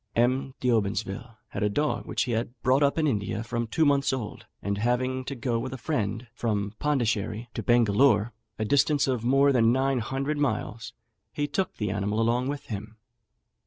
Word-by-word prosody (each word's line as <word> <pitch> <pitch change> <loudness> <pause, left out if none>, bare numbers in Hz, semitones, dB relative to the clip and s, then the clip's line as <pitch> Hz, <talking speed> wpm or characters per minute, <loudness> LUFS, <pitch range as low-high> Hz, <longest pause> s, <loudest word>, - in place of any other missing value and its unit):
M. 130 +3 +1
D'Obsonville 110 0 -1
had - - -5
a 105 - +2
dog 120 +1 -1
which - - 0
he 125 - -3
had 115 +2 -2
brought 130 +3 +4
up 140 +1 +3
in 160 - +2
India 110 -4 -1
from 115 0 -2
two 155 +9 +2
months 140 -1 +3
old; 125 -6 -5
and 100 +1 -2
having 130 +3 0
to 140 - -4
go 120 -1 -1
with 130 +2 -4
a - - -5
friend 115 -4 -2
from 105 -4 -1
Pondicherry 115 -5 0
to - - -3
Bengalore, 120 -1 +4 0.3
a 110 - -1
distance 145 +3 +3
of 125 -4 0
more 135 +3 +4
than 115 -3 +4
nine 135 +1 +2
hundred 135 +6 -2
miles, 115 -4 -2 0.4
he 145 - -1
took 185 +6 -2
the 105 -3 -1
animal 100 +2 -1
along 120 +3 +2
with 140 0 -4
him. 110 +1 -7
120 Hz, 185 wpm, -27 LUFS, 110-135 Hz, 0.4 s, brought